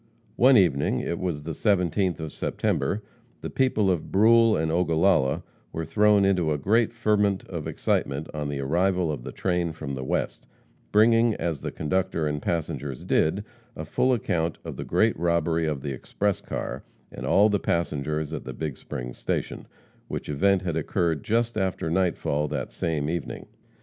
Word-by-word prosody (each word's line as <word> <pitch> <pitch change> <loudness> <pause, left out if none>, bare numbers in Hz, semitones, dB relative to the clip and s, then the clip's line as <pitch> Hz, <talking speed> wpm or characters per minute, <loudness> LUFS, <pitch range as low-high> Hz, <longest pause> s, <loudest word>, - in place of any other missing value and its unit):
One 130 +1 +6
evening 75 -8 +2
it 85 - -3
was 85 -6 -3
the 80 - -4
17th 90 -1 +1
of 80 -2 -6
September 105 +2 -1 0.4
the - - -5
people 110 -7 +2
of 85 -4 -3
Brule 115 +2 +5
and 80 0 0
Ogallala 85 -4 +2 0.3
were 80 - -4
thrown 105 +3 +4
into 90 -5 +2
a 75 - +1
great 110 - +2
ferment 105 -4 +1
of 85 -5 -5
excitement 70 +3 -1
on 75 -1 -3
the 70 -1 -3
arrival 90 +4 +1
of 70 -5 -5
the - - -7
train 90 -3 -1
from 70 -3 -6
the 65 -1 -4
West, 65 - -2 0.4
bringing, 115 +1 +4
as 80 -5 -3
the - - -4
conductor 95 0 -1
and 75 -1 -2
passengers 75 -5 -3
did, 95 +6 +1 0.3
a - - -6
full 130 - +1
account 85 -9 0
of - - -6
the - - -5
great - - +2
robbery 85 -1 +1
of 70 -4 -3
the 70 - -3
express 100 +9 -2
car, - - -5 0.3
and - - -8
all 105 +2 +5
the 100 -1 +1
passengers, 75 -3 -1
at - - -6
Big 75 -4 -4
Springs - - -7
station, - - -3 0.4
which - - -5
event 95 +6 +2
had 85 -4 -2
occurred 80 -1 0
just 115 0 0
after 95 -4 -1
nightfall 85 -5 0
that 70 -4 -4
same 75 -3 -2
evening. 85 -1 -4
85 Hz, 170 wpm, -26 LUFS, 75-100 Hz, 0.4 s, One